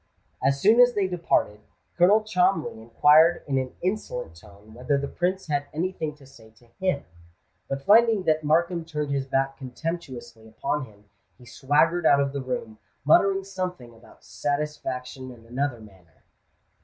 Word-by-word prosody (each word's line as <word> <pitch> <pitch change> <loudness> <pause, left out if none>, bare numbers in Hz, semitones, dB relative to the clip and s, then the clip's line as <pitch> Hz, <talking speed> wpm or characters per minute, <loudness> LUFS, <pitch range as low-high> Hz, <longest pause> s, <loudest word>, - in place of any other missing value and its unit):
As 140 +1 +1
soon 220 - +4
as 245 0 +6
they 205 - +1
had 185 - -2
departed, 165 -11 0 0.4
Colonel 200 +5 +4
Cholmondeley 180 - 0
inquired 150 +8 +4
in 135 -2 0
an 130 -1 -5
insolent 125 - -3
tone 105 +4 -17
whether 125 +4 -1
the 140 0 -3
Prince 185 +4 -2
had 145 -2 -2
any 180 +4 -1
thing 155 -5 -5
to 145 -2 -18
say 120 -5 -17
to 120 - -22
him; 185 -7 0 0.7
but 135 0 -4
finding 220 -1 +5
that 155 -2 +1
Markham 170 +3 +1
turned 150 -3 -4
his 135 -1 -2
back 135 0 -1
contemptuously 130 -5 -7
upon 135 +5 -3
him, 105 -3 -20 0.3
he 125 - -17
swaggered 155 +7 +1
out 140 - +5
of 140 -1 0
the 140 - -3
room, 125 -4 -5 0.3
muttering 195 +6 +4
something 180 -10 -6
about 115 +1 -20
"satisfaction 135 -3 -4
in 120 -2 -14
another 125 +1 -3
manner." 95 -7 -19
145 Hz, 165 wpm, -25 LUFS, 125-175 Hz, 0.7 s, as